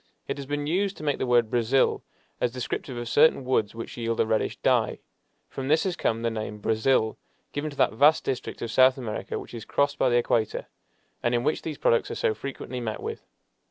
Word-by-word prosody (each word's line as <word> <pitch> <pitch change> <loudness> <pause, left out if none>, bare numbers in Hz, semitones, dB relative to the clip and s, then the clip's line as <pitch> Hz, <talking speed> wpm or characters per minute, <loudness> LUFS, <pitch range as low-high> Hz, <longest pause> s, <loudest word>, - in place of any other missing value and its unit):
It - - -3
has 140 -1 -7
been 145 0 -2
used 190 +5 0
to - - -9
make 145 -2 0
the 130 - -1
word 120 -2 +3
"brazil," 120 +2 +2 0.4
as 125 - +1
descriptive 125 0 -4
of 120 0 -4
certain 145 +1 +4
woods 110 -4 +1
which 115 - -7
yield 115 -1 -2
a - - +4
reddish 110 0 0
dye. - - +2 0.5
From 135 -1 -5
this 155 +3 +3
has 185 -2 -1
come 115 -8 -1
the 115 - +1
name 110 -1 -4
"Brazil," 110 +1 +1 0.3
given 145 +2 -2
to 140 - -12
that - - +3
vast 145 +7 +5
district 130 -3 -4
of 115 - -3
South 130 +2 +5
America 115 -5 -4
which - - -9
is 115 -2 -6
crossed 140 +5 0
by 130 - +4
the 120 - +3
equator, 115 -2 0 0.6
and 120 0 +1
in 120 - +1
which 155 - 0
these 155 -3 -5
products 115 - +2
are - - -4
so - - +1
frequently 130 0 -6
met 110 -2 -3
with. - - -6
125 Hz, 220 wpm, -26 LUFS, 115-140 Hz, 0.6 s, vast